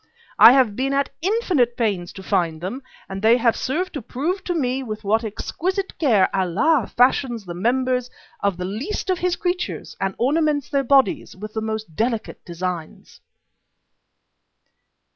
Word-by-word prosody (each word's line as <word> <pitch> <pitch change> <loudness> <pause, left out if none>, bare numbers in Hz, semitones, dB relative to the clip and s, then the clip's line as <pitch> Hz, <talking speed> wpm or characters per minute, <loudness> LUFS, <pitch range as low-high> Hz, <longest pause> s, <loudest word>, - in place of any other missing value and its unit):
I 235 - +10
have 255 -6 +3
been 270 +3 -1
at 280 0 0
infinite 350 - +1
pains 200 -7 -1
to 190 - -10
find 165 -4 0
them, 195 - -5 0.3
and 195 0 -6
they 225 +3 +5
have 230 -2 +2
served 360 +8 -2
to 290 - -4
prove 325 - -3
to 355 - -1
me 265 -4 0
with 215 -4 -6
what 220 +3 +1
exquisite 370 - -3
care 220 - +4
Allah 205 - +2
fashions 245 -3 +2
the 175 - -6
members 250 +5 0 0.3
of 200 -3 0
the 180 - -4
least 260 - -3
of 365 - -1
His 360 -1 0
creatures 360 0 -3
and 195 0 -1
ornaments 290 +2 +1
their 275 -1 +1
bodies 275 +4 +2
with 215 +3 -8
the 220 - -2
most 220 -6 -4
delicate 225 +1 -2
designs." 175 -1 -6
245 Hz, 160 wpm, -22 LUFS, 200-290 Hz, 0.3 s, I